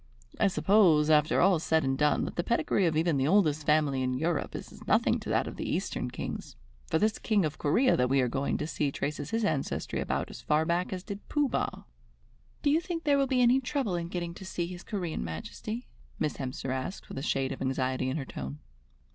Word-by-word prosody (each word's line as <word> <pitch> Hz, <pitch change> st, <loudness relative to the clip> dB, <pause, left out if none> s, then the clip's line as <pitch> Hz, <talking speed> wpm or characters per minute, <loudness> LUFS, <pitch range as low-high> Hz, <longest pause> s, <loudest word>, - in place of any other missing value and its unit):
I -, -, +5 dB
suppose, 180 Hz, -6 st, +4 dB
after 150 Hz, 0 st, +4 dB
all 185 Hz, -2 st, +5 dB
said 160 Hz, -1 st, +2 dB
and 135 Hz, 0 st, +1 dB
done, 150 Hz, +2 st, +2 dB
that -, -, -6 dB
the 175 Hz, -, 0 dB
pedigree 200 Hz, -3 st, +1 dB
of 155 Hz, -2 st, 0 dB
even 165 Hz, -2 st, +2 dB
the 135 Hz, +1 st, +1 dB
oldest 155 Hz, -5 st, +3 dB
family 150 Hz, -3 st, +3 dB
in 130 Hz, 0 st, 0 dB
Europe 160 Hz, +3 st, -1 dB
is -, -, -7 dB
as -, -, -14 dB
nothing -, -, +3 dB
to -, -, -7 dB
that -, -, +2 dB
of -, -, -7 dB
the -, -, -3 dB
Eastern -, -, -2 dB
Kings, -, -, -6 dB, 0.3 s
for -, -, +1 dB
this 215 Hz, +5 st, +1 dB
King 210 Hz, -6 st, +2 dB
of 155 Hz, 0 st, -4 dB
Corea 245 Hz, -, +3 dB
that 125 Hz, 0 st, +2 dB
we 135 Hz, +1 st, +3 dB
are 125 Hz, -, +3 dB
going 135 Hz, +3 st, -1 dB
to 150 Hz, -, -2 dB
see 150 Hz, -2 st, -1 dB
traces 145 Hz, +1 st, -3 dB
his 225 Hz, -1 st, 0 dB
ancestry 150 Hz, -6 st, -1 dB
about -, -, -2 dB
as -, -, -9 dB
far 155 Hz, +1 st, +2 dB
back 175 Hz, +2 st, 0 dB
as 185 Hz, -1 st, -4 dB
did 200 Hz, -1 st, -8 dB
Pooh 295 Hz, -1 st, +2 dB
Bah." -, -, -2 dB, 0.8 s
"Do 285 Hz, -, +4 dB
you 320 Hz, +3 st, +3 dB
think 345 Hz, -2 st, -4 dB
there 285 Hz, -2 st, +3 dB
will 275 Hz, -, +2 dB
be 255 Hz, -1 st, +3 dB
any 245 Hz, +2 st, +5 dB
trouble 265 Hz, -6 st, -1 dB
in 170 Hz, -1 st, -2 dB
getting 170 Hz, -1 st, -4 dB
to 185 Hz, -, -10 dB
see 180 Hz, -2 st, -3 dB
his 175 Hz, +1 st, -8 dB
Corean 180 Hz, -6 st, -3 dB
Majesty?" 215 Hz, -, -5 dB, 0.3 s
Miss 155 Hz, -2 st, -1 dB
Hemster 130 Hz, 0 st, -4 dB
asked 130 Hz, +9 st, -5 dB
with -, -, -6 dB
a -, -, -5 dB
shade 135 Hz, -2 st, 0 dB
of -, -, -6 dB
anxiety 130 Hz, -1 st, 0 dB
in 135 Hz, -, -1 dB
her 140 Hz, -, -4 dB
tone. 70 Hz, -, -6 dB
160 Hz, 230 wpm, -29 LUFS, 140-200 Hz, 0.8 s, I